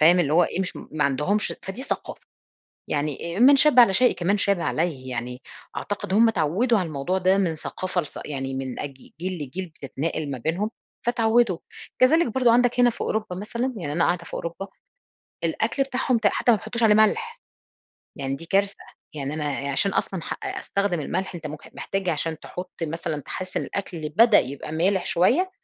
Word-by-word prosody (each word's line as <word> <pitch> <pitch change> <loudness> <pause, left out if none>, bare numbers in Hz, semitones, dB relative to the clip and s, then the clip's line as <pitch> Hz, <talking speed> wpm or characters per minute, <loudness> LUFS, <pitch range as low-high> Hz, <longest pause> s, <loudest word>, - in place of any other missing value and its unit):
فاهم؟ 170 +4 +6
اللي 150 -4 +1
هو 175 +2 +6
إيه 180 - -3
مش 190 - -3
ما 155 -1 -3
عندهُمش 150 +10 +1
فدي 195 +7 -5
ثقافة، - - -4 0.7
يعني 150 - -2
من 275 +3 +8
شبَّ 275 -2 +6
على 235 -5 +7
شيء 250 +5 +4
كمان 195 +4 +1
شاب 200 -2 +2
عليه 155 -7 -1
يعني، 125 +1 -5 0.3
أعتقد 205 -2 -4
هم 225 +2 +6
اتعودوا 215 - +2
على 185 - -1
الموضوع 155 +4 -1
ده 190 +1 +3
من 180 -5 +1
ثقافة 185 +3 -3
لث 150 - -8
يعني 135 -2 -4
من 130 -1 -4
أج 145 -1 -5 0.3
جيل 180 -2 -3
لجيل 180 +7 -5
بتتناقل 150 0 -4
ما 135 - -4
بينهم، 170 - -1 0.4
فاتعوّدوا، 230 -5 +3 0.4
كذلك 320 +7 +5
برضه 250 -3 +4
عندك 245 +1 +3
هنا 245 0 +6
في 230 - -12
أوروبا 215 -4 -2
مثلًا، 235 +6 -2
يعني 160 -8 -4
أنا 170 +3 +2
قاعدة 175 -1 0
في - - -9
أوروبا، 170 +4 -5 0.8
الأكل 220 - 0
بتاعهم 260 -2 0
ت 220 - 0
حتى 240 - +3
ما - - +4
بيحطوش 220 +2 -4
عليه 215 -2 +6
ملح، 215 - +2 0.8
يعني 135 0 -2
دي 165 - -10
كارثة، 200 +2 +1 0.4
يعني 145 0 -3
أنا 145 -2 -2
عشان 195 +8 +2
أصلًا 185 -2 -1
ح - - -4
أستخدِم 200 -4 -1
الملح 190 +6 -3
أنتَ 165 -2 -6
ممك 150 0 -9
محتاج 195 -1 -3
عشان 160 0 -1
تحطّ 180 +1 -7
مثلًا 160 -1 -3
تحس 185 +5 -6
إن - - +1
الأكل 170 -6 -4
بدأ 225 +11 +6
يبقى 140 +3 -3
مالح 180 +4 +2
شوية، 255 - +3
180 Hz, 185 wpm, -24 LUFS, 155-220 Hz, 0.8 s, من